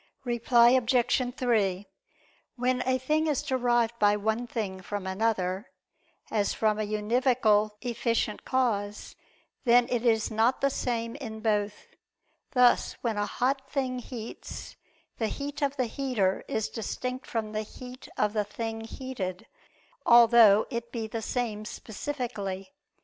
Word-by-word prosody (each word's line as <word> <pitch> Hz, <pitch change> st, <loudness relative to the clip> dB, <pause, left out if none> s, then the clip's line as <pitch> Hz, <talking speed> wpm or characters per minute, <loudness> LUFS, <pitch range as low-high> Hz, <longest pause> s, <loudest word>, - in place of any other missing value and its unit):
Reply 240 Hz, -1 st, +4 dB
Obj. 250 Hz, 0 st, +2 dB
3: 205 Hz, -6 st, +1 dB, 0.7 s
When 250 Hz, 0 st, 0 dB
a 260 Hz, 0 st, +3 dB
thing 305 Hz, +5 st, +1 dB
is 295 Hz, -4 st, 0 dB
derived 240 Hz, -3 st, +1 dB
by 205 Hz, 0 st, +4 dB
one 220 Hz, +3 st, -1 dB
thing 200 Hz, -6 st, -4 dB
from 200 Hz, +1 st, -5 dB
another, 190 Hz, 0 st, -1 dB, 0.6 s
as 205 Hz, -2 st, +1 dB
from 215 Hz, -1 st, +1 dB
a 215 Hz, -, -1 dB
univocal 215 Hz, 0 st, +2 dB
efficient 230 Hz, -3 st, -1 dB
cause, 210 Hz, -5 st, -1 dB, 0.5 s
then 240 Hz, -1 st, +5 dB
it 245 Hz, -2 st, 0 dB
is 225 Hz, -3 st, +2 dB
not 225 Hz, +4 st, +2 dB
the 275 Hz, 0 st, +2 dB
same 230 Hz, -2 st, -2 dB
in 220 Hz, -6 st, -7 dB
both: 210 Hz, -1 st, -1 dB, 0.7 s
thus 250 Hz, -2 st, +4 dB
when 225 Hz, -3 st, -1 dB
a 205 Hz, 0 st, 0 dB
hot 270 Hz, +2 st, -1 dB
thing 260 Hz, -3 st, -1 dB
heats, 235 Hz, -2 st, -8 dB, 0.4 s
the 225 Hz, -, +1 dB
heat 285 Hz, +5 st, -5 dB
of 285 Hz, 0 st, 0 dB
the 255 Hz, -, +1 dB
heater 225 Hz, -6 st, 0 dB
is 220 Hz, -, -1 dB
distinct 250 Hz, +3 st, -4 dB
from 220 Hz, -2 st, -3 dB
the 215 Hz, 0 st, -2 dB
heat 250 Hz, +4 st, -10 dB
of 210 Hz, 0 st, +1 dB
the 210 Hz, -1 st, +1 dB
thing 225 Hz, +2 st, -5 dB
heated, 225 Hz, -6 st, -5 dB, 0.6 s
although 235 Hz, -3 st, +7 dB
it 235 Hz, -1 st, -4 dB
be 230 Hz, -2 st, -3 dB
the 225 Hz, +1 st, -4 dB
same 220 Hz, -2 st, -2 dB
specifically. 215 Hz, -5 st, -5 dB
230 Hz, 140 wpm, -28 LUFS, 210-250 Hz, 0.7 s, although